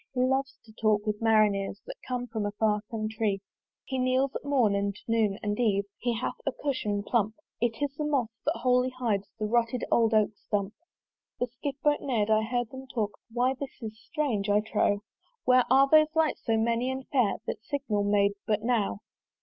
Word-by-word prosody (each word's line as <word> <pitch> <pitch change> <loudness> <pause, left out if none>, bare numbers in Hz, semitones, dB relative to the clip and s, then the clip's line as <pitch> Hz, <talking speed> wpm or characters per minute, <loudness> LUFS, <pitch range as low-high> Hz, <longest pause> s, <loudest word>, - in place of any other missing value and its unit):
He 250 - +1
loves 265 +1 +1
to 220 - -16
talk 215 -1 +1
with 210 0 -2
Marineres 210 -3 +3
That - - -9
come 250 -1 -2
from 225 -3 -3
a 205 - -1
far 210 0 +1
Contrée. 215 -2 -1 0.5
He 265 -1 -3
kneels 255 +1 +1
at - - -4
morn 260 -8 +2
and 200 0 0
noon 220 -3 +2
and 210 +1 -1
eve 205 -4 +2 0.2
He 240 -1 0
hath 255 - -2
a 275 - 0
cushion 230 -7 -2
plump: 220 -1 0 0.2
It 235 +3 0
is 280 -1 -1
the 305 - -3
moss, 280 -6 +1
that - - 0
wholly 250 0 +3
hides 230 -6 -2
The 215 - -2
rotted 235 +2 +1
old 225 -1 +4
Oak 215 -1 +4
stump. 205 0 -2 0.7
The 245 - +2
Skiff 265 +3 -6
boat 295 -1 +3
ne'rd: 220 -6 0
I 215 0 +5
heard 240 +1 -2
them 265 0 -9
talk, 220 -5 -1 0.2
"Why, 250 +3 +2
this 275 0 -8
is 220 -1 -5
strange, 240 -11 -1
I 205 +1 +4
trow! 205 -1 +1 0.4
"Where 255 0 +5
are 270 +2 +6
those 310 +1 +5
lights 320 -1 +2
so 225 -2 +2
many 230 +3 +1
and 260 0 -4
fair 245 -8 +2
"That - - -4
signal 240 -7 -1
made 200 0 +3 0.2
but 210 -1 +1
now? 220 - 0
230 Hz, 200 wpm, -28 LUFS, 210-260 Hz, 0.7 s, are